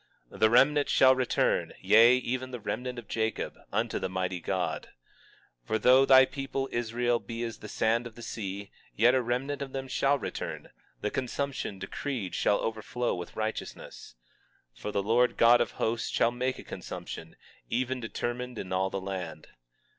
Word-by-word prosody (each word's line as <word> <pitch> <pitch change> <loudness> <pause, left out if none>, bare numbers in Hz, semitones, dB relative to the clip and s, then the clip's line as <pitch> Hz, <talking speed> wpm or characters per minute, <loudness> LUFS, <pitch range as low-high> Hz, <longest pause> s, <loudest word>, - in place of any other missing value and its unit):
20:21 - - -11
The 110 - +5
remnant 140 +5 +4
shall 130 0 +6
return, 130 -1 +1
yea, 115 +3 +7
even 130 +1 -3
the 125 -1 -6
remnant 125 +4 -4
of 120 - -8
Jacob, 110 0 -2 0.2
unto - - 0
the - - -2
mighty 90 -1 -2
God. - - -2 0.8
20:22 - - -34
For 110 - +1
though 130 +4 +6
thy 130 0 +8
people 135 0 -3
Israel 120 +1 0
be 115 0 -5
as 115 -1 -5
the 105 - -9
sand 115 +3 +1
of 115 - -14
the 120 - -10
sea, 100 -2 -5 0.2
yet 120 +3 +5
a 130 - +3
remnant 125 +4 -2
of 135 -1 -5
them 135 -1 -4
shall 140 +2 +2
return; - - -5 0.3
the 105 - -1
consumption 135 -4 -3
decreed 95 +2 -4
shall 100 - +2
overflow 115 +2 -2
with 90 -1 -6
righteousness. 110 - -5 0.6
20:23 - - -19
For 105 - -3
the 100 -1 0
Lord 120 +4 +3
God 120 +1 +6
of - - -1
Hosts 115 +1 -1
shall 115 - +2
make 125 +2 -2
a - - -9
consumption, 80 0 -8 0.3
even 130 +2 -1
determined 120 +1 -4
in 95 -2 -5
all 95 +1 +1
the 95 - -3
land. 90 -5 -6
120 Hz, 175 wpm, -29 LUFS, 105-130 Hz, 0.8 s, thy